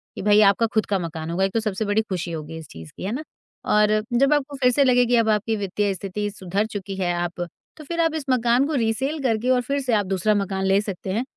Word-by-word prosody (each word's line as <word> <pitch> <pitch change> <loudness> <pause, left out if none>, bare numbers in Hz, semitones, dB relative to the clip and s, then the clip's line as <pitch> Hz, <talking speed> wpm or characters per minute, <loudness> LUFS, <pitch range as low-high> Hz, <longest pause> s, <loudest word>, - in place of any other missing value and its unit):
कि - - -5
भाई 205 +1 +5
आपका 200 +2 +4
खुद 220 -2 +2
का 195 -2 0
मकान 160 -1 -5
होगा, 180 +3 0
एक 195 - -3
तो 225 - +2
सबसे 215 -1 -2
बड़ी 205 +2 +2
खुशी 185 -5 -4
होगी 160 0 -6
इस 160 -2 -9
चीज़ 80 -1 -11
की, - - -7
है 200 - -2
ना? 285 +6 -3 0.4
और 210 0 +3
जब 275 +4 +4
आपको 290 -1 -1
फिर 250 - +5
से 280 +3 +3
लगे 250 -2 +4
कि 245 +1 +2
अब 225 -1 +2
आपकी 215 +1 +1
वित्तीय 200 0 -1
स्थिति 195 +3 -4
सुधर 195 +1 -2
चुकी 200 -3 -6
है, 180 -2 0
आप 175 0 -2 0.4
तो 310 - -10
फिर 335 +2 -1
आप 325 -1 +2
इस 310 -3 -4
मकान 245 +1 +3
को 310 - -3
रिसेल 265 +5 0
करके 235 0 0
और 250 -1 +3
फिर 280 +3 -2
से 255 -3 -1
आप 205 -2 +2
दूसरा 195 +3 +1
मकान 195 -1 -1
ले 195 +1 +4
सकते 195 -2 -5
हैं 230 +5 0
210 Hz, 265 wpm, -23 LUFS, 190-245 Hz, 0.4 s, भाई